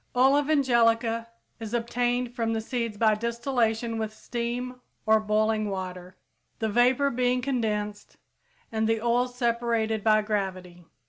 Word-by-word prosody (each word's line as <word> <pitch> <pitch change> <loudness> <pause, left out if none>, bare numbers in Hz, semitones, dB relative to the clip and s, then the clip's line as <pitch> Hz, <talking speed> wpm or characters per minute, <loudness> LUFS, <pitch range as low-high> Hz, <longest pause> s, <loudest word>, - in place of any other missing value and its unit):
Oil 265 +3 +5
of 290 0 0
angelica 230 -5 +2 0.3
is 225 +1 -4
obtained 245 +1 -1
from 225 -1 -1
the 225 - 0
seeds 230 -1 -3
by 220 0 +4
distillation 235 0 -1
with 220 -1 -2
steam 245 +2 -4 0.2
or 220 0 +5
boiling 215 0 +1
water, 185 -1 -6 0.4
the 220 - -1
vapor 250 +5 +3
being 250 +1 +1
condensed 215 -5 -3 0.5
and 220 0 0
the 225 0 +2
oil 240 +2 +1
separated 235 -3 -1
by 215 -1 +4
gravity. 185 -4 -4
230 Hz, 135 wpm, -27 LUFS, 215-245 Hz, 0.5 s, Oil